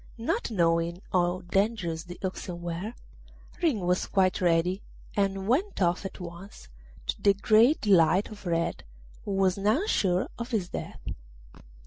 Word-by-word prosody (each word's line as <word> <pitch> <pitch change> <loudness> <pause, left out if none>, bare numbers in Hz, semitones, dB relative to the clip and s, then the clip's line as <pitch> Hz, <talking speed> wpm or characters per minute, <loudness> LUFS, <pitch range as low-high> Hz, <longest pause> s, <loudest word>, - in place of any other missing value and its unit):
Not 230 +1 -1
knowing 170 -3 +1
how 180 0 +2
dangerous 180 -3 -1
the 175 0 -9
oxen 185 -2 -4
were, 175 +7 -4 0.7
Ring 300 - +2
was 180 +1 +1
quite 190 -2 +2
ready, 175 +2 +2 0.3
and 195 -1 0
went 330 - +1
off 180 +1 +1
at 195 - -6
once, 170 - -10 0.4
to - - -3
the 200 -1 +5
great 220 +8 +4
delight 185 -1 +4
of 205 -3 -9
Red, 170 -1 -1 0.4
who 200 - -2
was 190 0 +2
now 220 - +2
sure 185 - +1
of 235 +1 -4
his 205 -7 -1
death. - - -6
190 Hz, 145 wpm, -28 LUFS, 175-210 Hz, 0.7 s, the